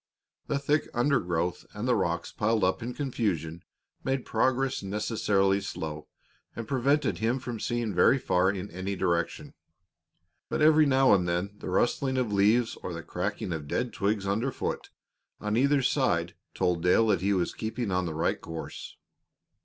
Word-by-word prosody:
The 145 - 0
thick 145 +2 +1
undergrowth 90 - 0
and 105 +4 -3
the 125 - +4
rocks 85 -5 -1
piled 110 -1 0
up 95 +5 +1
in 120 +2 -5
confusion 90 - -2 0.4
made 135 -1 -1
progress 130 +3 +1
necessarily 100 -1 +1
slow 75 -4 -5 0.5
and 115 -2 -5
prevented 140 +2 +1
him 115 +3 +1
from 120 -3 -5
seeing 120 -3 -2
very 90 +9 +5
far 95 -6 +2
in 100 0 -4
any 95 +3 -4
direction. 85 -2 -1 1.0
But - - 0
every 155 -1 +6
now 135 -2 +5
and 90 -3 +2
then 90 +3 -1
the - - -6
rustling 130 +7 +1
of 125 -3 0
bushes 105 +4 +3
or 90 - -5
the 85 0 -6
cracking 90 0 -3
of 75 -3 -5
dead 125 +10 -2
twigs 100 0 0
under 110 +7 0
foot - - -4 0.5
on 105 0 -1
either 140 +3 +3
side - - +1 0.2
told 90 -2 +1
Dale 90 +6 +4
that 95 -5 +2
he 100 +2 +2
was 90 -2 0
keeping 110 -1 -3
on 90 -1 0
the 80 - -4
right 80 - 0
course. 80 -1 -8
105 Hz, 165 wpm, -28 LUFS, 90-125 Hz, 1.0 s, every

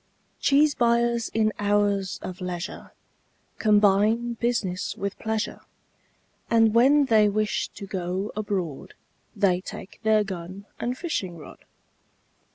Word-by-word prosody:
Cheese 290 +1 +4
buyers 235 -1 +1
in 215 -1 +1
hours 200 -2 +1
of 185 0 -7
leisure 180 +1 -5 0.7
Combine 215 +3 +3
business 230 -6 -2
with 200 0 -3
pleasure, 220 0 -2 0.9
And 225 -2 +4
when 275 +5 +5
they 215 -4 +4
wish 215 +1 -1
to 200 - -7
go 185 +1 -3
abroad 195 -8 -4 0.4
They 190 -3 +2
take 185 - -9
their 215 -1 +3
gun 190 0 -7
and 245 +1 -2
fishing 195 - -3
rod. 155 - -13
210 Hz, 115 wpm, -25 LUFS, 190-230 Hz, 0.9 s, when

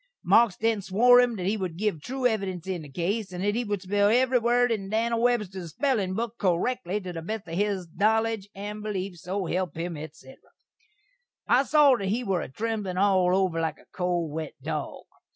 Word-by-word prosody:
Marks 230 -6 +4
then 225 -2 +1
swore 240 +6 +5
him 245 -2 +1
that 185 -3 -4
he 200 +3 +1
would 185 -5 -4
giv 200 -6 -1
true 260 - -4
evidense 195 -7 0
in 185 -3 -3
this 145 -3 -11
case, 195 +6 -2
and 180 +1 -5
that 205 0 +1
he 240 +3 -1
would 205 -3 -3
spell 205 +2 +2
evry 250 +2 +3
word 240 +1 +3
in 195 -4 -2
Dan'l 230 +2 0
Webster's 195 -8 -1
spellin' 225 -8 0
book 235 +1 -4
correkly 200 +2 0
to 185 -3 -7
the 165 - -5
best 215 +3 -5
of 165 - -7
his 195 -1 -1
knowledge 220 -1 +1
and 205 +2 -6
beleef, 195 -3 -4
so 185 +4 -3
help 180 -2 -2
him, 170 0 -3
etc. 150 -3 -10 1.1
I 245 +2 +5
saw 290 -3 +5
that 195 - -3
he 225 +6 0
were 190 -6 0
a - - -6
tremblin' 210 +2 -3
all 185 -2 +3
over 185 -4 +1
like 160 -1 -2
a - - -20
cold 175 -3 -1
wet 155 0 -5
dog. - - -4
200 Hz, 205 wpm, -26 LUFS, 180-225 Hz, 1.1 s, swore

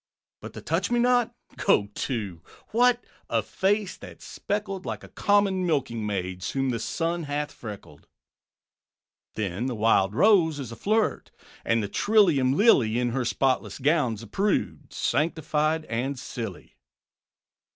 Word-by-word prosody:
'But - - -9
the - - -9
Touchmenot?' 240 0 +2 0.3
Go 100 -1 +2
to! 105 -11 -4 0.3
What! 245 +1 +3 0.2
a - - +1
face 200 0 0
that's - - -12
speckled 200 -2 -4
Like - - -5
a - - -10
common 200 -2 +2
milking 130 -10 -1
maid's, 90 -2 -3
Whom 135 -1 0
the 115 - -2
sun 165 +7 -2
hath 145 +1 -3
freckled. 105 -4 -10 1.3
Then 105 +3 -2
the 125 - -3
Wild 105 -2 +2
Rose 175 - +4
is 130 -5 -6
a - - -7
flirt; 215 - 0 0.3
And 115 -1 +1
the - - -2
trillium 165 - +3
Lily, 125 - +4
In 125 0 +1
her 125 +2 -1
spotless 130 +2 0
gown, 140 -5 +1
's 110 - -10
a - - -10
prude, 200 - -1
Sanctified 155 +2 0
and 125 +5 -2
silly. 115 -6 -7
140 Hz, 140 wpm, -26 LUFS, -, 1.3 s, Rose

